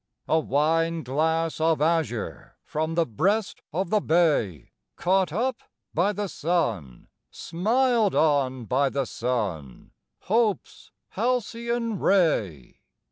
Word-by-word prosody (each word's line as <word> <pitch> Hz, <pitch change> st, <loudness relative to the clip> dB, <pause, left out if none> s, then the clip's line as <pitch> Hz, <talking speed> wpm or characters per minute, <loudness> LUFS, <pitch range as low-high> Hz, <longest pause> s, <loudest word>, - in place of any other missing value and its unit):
A 160 Hz, -, +3 dB
wine 160 Hz, +3 st, +1 dB
glass 160 Hz, +5 st, 0 dB
of 160 Hz, 0 st, +2 dB
azure 150 Hz, -, -1 dB
From 160 Hz, +2 st, -2 dB
the 170 Hz, -1 st, +2 dB
breast 190 Hz, -, -1 dB
of 175 Hz, +3 st, -2 dB
the 215 Hz, -1 st, +3 dB
bay, 150 Hz, -, +1 dB, 0.2 s
Caught 185 Hz, -2 st, +1 dB
up 240 Hz, +7 st, -1 dB, 0.3 s
by 180 Hz, +5 st, +2 dB
the 205 Hz, 0 st, -3 dB
sun, 115 Hz, -, -2 dB, 0.2 s
Smiled 225 Hz, +4 st, +1 dB
on 135 Hz, -5 st, +1 dB
by 135 Hz, +5 st, +1 dB
the 135 Hz, 0 st, -1 dB
sun, 105 Hz, -, -4 dB, 0.3 s
Hope's 215 Hz, 0 st, -1 dB, 0.2 s
halcyon 235 Hz, -1 st, -1 dB
ray! 110 Hz, -, +1 dB
165 Hz, 110 wpm, -25 LUFS, 130-200 Hz, 0.3 s, A